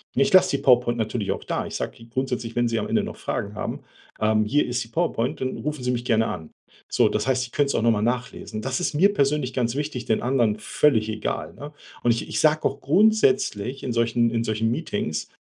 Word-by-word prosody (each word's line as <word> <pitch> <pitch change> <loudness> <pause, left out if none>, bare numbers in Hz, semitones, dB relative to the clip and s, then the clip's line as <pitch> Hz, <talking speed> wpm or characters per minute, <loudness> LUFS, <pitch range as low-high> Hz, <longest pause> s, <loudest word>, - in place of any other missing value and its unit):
Ne, 135 - +4
ich - - -1
lasse 185 -6 +5
die - - -10
PowerPoint 120 -2 +4
natürlich 110 -2 -2
auch - - -4
da. - - -2
Ich - - -7
sage - - -4
die 115 0 -15
grundsätzlich: 125 -2 -3
„Wenn 120 0 +2
Sie 115 -1 0
am 105 - -3
Ende - - +2
noch - - -6
Fragen - - -4
haben, - - -4 0.4
ähm, 110 0 +2
hier 145 +8 +2
ist 120 0 -1
die 115 - -13
PowerPoint 150 -3 -1
und 130 0 -2
rufen 150 -3 -4
Sie 125 - 0
mich 120 0 -3
gerne 115 -2 +2
an.“ 80 - -6 0.4
So, - - +3
das 105 +3 -1
heißt, 130 -1 +2
sie 125 - -7
können's 140 -1 +1
auch - - +1
noch 115 - +4
mal 105 -2 0
nachlesen. 120 -2 -3
Das 130 +2 -2
ist 180 - -1
mir 195 +7 +4
persönlich 140 -5 +1
ganz 120 -1 -1
wichtig, 145 -4 -3
den 110 - +1
anderen 120 -4 +1
völlig 110 -1 +2
egal, 110 - -3
ne? 145 +1 -10 0.3
Und, 120 - +4
ich 115 - -1
ich - - -1
sage 155 0 +3
auch 140 +1 -1
grundsätzlich 190 - +2
in 130 - -2
solchen 115 0 +2
in 115 0 -1
solchen 110 +1 0
Meetings: 105 - -3
125 Hz, 235 wpm, -24 LUFS, 115-140 Hz, 0.4 s, lasse